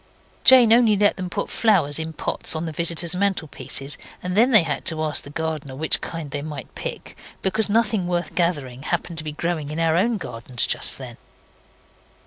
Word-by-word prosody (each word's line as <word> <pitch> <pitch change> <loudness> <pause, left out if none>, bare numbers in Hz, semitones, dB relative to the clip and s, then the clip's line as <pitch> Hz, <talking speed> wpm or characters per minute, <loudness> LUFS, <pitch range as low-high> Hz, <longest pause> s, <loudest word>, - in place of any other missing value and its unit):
Jane 250 -4 +8
only 230 -3 +5
let 205 +1 +3
them 185 -1 -4
put - - -3
flowers 175 -10 +2
in 160 - -3
the 160 - -8
pots - - 0
on 160 +1 -2
the 160 - -4
visitors' 170 +1 0
mantelpieces, 170 -7 -2 0.2
and 180 0 -3
then 235 +5 +5
they 215 -8 +6
had 155 - -3
to 160 -1 +1
ask 155 -1 -1
the - - -10
gardener 155 -3 -4
which 155 +3 +1
kind 165 -4 -6
they 145 -1 -3
might 150 -1 -7
pick, - - -7 0.3
because 210 +3 0
nothing 210 -4 +1
worth 175 -3 -2
gathering 145 -8 -1
happened 170 +2 -3
to - - -3
be 155 - -4
growing 160 -2 -3
in 155 +2 -4
our 165 -1 +2
own 220 +6 +2
gardens 120 - -1
just - - +1
then. - - -9
165 Hz, 195 wpm, -22 LUFS, 150-195 Hz, 0.3 s, Jane